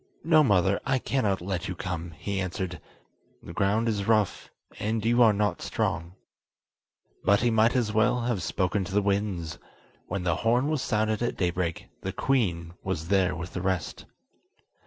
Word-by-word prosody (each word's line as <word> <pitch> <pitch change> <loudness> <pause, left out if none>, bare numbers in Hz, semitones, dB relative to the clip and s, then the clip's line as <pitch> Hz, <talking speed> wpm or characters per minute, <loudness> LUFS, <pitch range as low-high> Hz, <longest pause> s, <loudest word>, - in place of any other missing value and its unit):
"No, 160 -1 +5
mother, 100 -5 +3
I 135 - +1
cannot 110 -8 0
let 90 -1 -3
you 90 - -4
come," 85 -1 -4
he 100 +5 -3
answered; 90 -2 -4 0.6
"the - - -9
ground 105 +4 +1
is 100 -3 -1
rough, 110 -4 +1 0.3
and 110 +1 -1
you 120 +2 +4
are 115 -2 +7
not 105 -3 0
strong." 85 +2 -2 1.1
But 100 +2 +4
he 120 0 +2
might 110 +3 +3
as 115 -4 +1
well 110 +3 +3
have 120 -5 -1
spoken 95 +2 0
to 100 - -6
the 105 - +4
winds: 100 -5 -1 0.5
when 100 -2 -3
the 85 -2 +1
horn 120 +6 +2
was 155 -4 0
sounded 110 -2 0
at 120 - -1
daybreak 85 -2 -1
the - - -3
queen 85 -11 0
was 90 -3 -3
there 95 -3 +3
with 85 +1 -7
the 90 - -3
rest. 95 -4 -2
100 Hz, 170 wpm, -27 LUFS, 90-115 Hz, 1.1 s, are